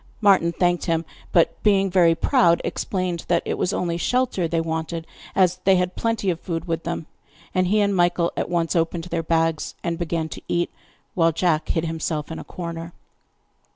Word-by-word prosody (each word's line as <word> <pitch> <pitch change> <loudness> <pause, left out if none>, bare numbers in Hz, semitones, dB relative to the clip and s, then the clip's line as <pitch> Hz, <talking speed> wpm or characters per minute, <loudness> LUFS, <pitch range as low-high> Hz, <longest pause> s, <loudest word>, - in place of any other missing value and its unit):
Martin 195 -5 +4
thanked 175 0 +1
him, 165 0 0 0.3
but 170 - +2
being 195 -2 +3
very 175 -3 +4
proud, 170 +1 +3
explained 185 -3 -2
that 170 -1 +2
it - - -1
was 180 - 0
only 170 -4 -1
shelter 245 -3 +1
they 165 0 0
wanted, 160 0 -3 0.3
as 180 -1 +3
they 195 0 +5
had 180 0 0
plenty 225 -4 0
of 170 - -4
food 170 -1 -4
with 165 -1 -2
them; 170 -1 -3 0.5
and 185 0 +2
he 210 +3 +3
and 200 -1 +2
Michael 175 -1 +2
at - - -2
once 170 0 0
opened 165 0 0
their 170 -1 -2
bags 165 -1 0
and 170 0 -2
began 165 -1 -1
to - - -8
eat, 175 0 0 0.4
while 165 -2 +3
Jack 160 -1 0
hid 165 -1 0
himself 160 -1 -3
in 160 - -5
a - - -7
corner. 170 -1 -6
170 Hz, 190 wpm, -23 LUFS, 165-180 Hz, 0.5 s, they